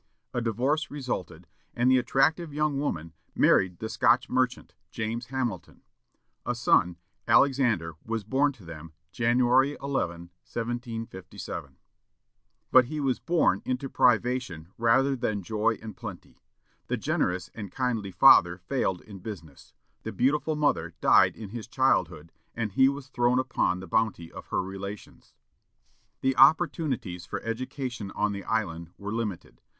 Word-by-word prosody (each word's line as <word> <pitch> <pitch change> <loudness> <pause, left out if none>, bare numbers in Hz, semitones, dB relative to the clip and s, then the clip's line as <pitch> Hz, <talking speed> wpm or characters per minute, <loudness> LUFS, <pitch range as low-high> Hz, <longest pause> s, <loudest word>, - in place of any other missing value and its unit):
A 120 - -1
divorce 130 +7 0
resulted, 130 - -5 0.3
and 125 +2 +3
the 130 - +5
attractive 155 +6 +1
young 150 -1 0
woman 85 - -3 0.2
married 90 -2 +3
the 110 - -5
Scotch 125 +3 +2
merchant, 125 -1 -1 0.2
James 115 +2 -4
Hamilton. 120 -9 -4 0.6
A 125 - -2
son, 90 -7 +2 0.3
Alexander, 120 - +3
was 115 -1 -3
born 135 +7 +2
to 105 -8 -17
them, 80 -1 -10 0.2
January 125 +6 +3
11, 85 -11 -3
1757. 115 - -6 0.9
But 130 -1 +7
he 155 +5 -5
was 135 -3 0
born 165 - +2
into 130 +1 -3
privation 120 -9 +1
rather 130 +4 +3
than 110 -5 -2
joy 110 +3 0
and 110 -3 -8
plenty. 100 -6 -10 0.5
The - - -1
generous 90 +1 -1
and 105 -3 -7
kindly 120 -6 -2
father 90 -3 +6
failed 95 -1 -2
in 100 -3 -11
business; 90 -8 -10 0.3
the - - -5
beautiful 150 +5 +1
mother 150 -1 0
died - - +5
in 105 -3 -8
his 115 +1 -7
childhood, 90 - 0 0.2
and 110 -3 -2
he 130 +7 +5
was 140 -1 -6
thrown 120 -1 +2
upon 125 -8 0
the 95 - -9
bounty 110 -7 -1
of - - -10
her - - -1
relations. 95 +2 -9 0.9
The 135 0 +1
opportunities 135 - +2
for - - -4
education 125 -1 -4
on 105 0 +1
the 100 -1 -5
island 85 -7 -2
were 100 0 -6
limited. 110 -6 -5
115 Hz, 140 wpm, -27 LUFS, 95-130 Hz, 0.9 s, But